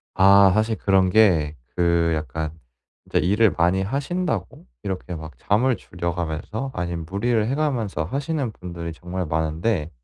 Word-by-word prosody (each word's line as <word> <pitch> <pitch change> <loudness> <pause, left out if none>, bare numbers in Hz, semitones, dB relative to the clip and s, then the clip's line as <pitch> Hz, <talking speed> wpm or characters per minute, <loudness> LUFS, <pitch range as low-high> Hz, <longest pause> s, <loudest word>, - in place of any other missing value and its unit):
아 100 0 +7
사실 110 +2 +1
그런 95 -2 +3
게 85 -8 +4 0.2
그 85 -1 +2
약간 80 0 -4 0.5
이제 - - -1
일을 100 +6 +4
많이 90 +3 +3
하신다고 140 - -3 0.2
이렇게 95 -2 -4
막 80 -1 -9
잠을 120 +5 +2
줄여 85 -5 -4
가면서 90 - -4
아니면 85 -2 -3
무리를 110 +2 +1
해 135 - 0
가면서 120 - -1
하시는 140 - -2
분들이 85 -4 -7
정말 90 +2 -5
많은데 80 +3 -1
95 Hz, 305 characters per minute, -23 LUFS, 85-110 Hz, 0.5 s, 아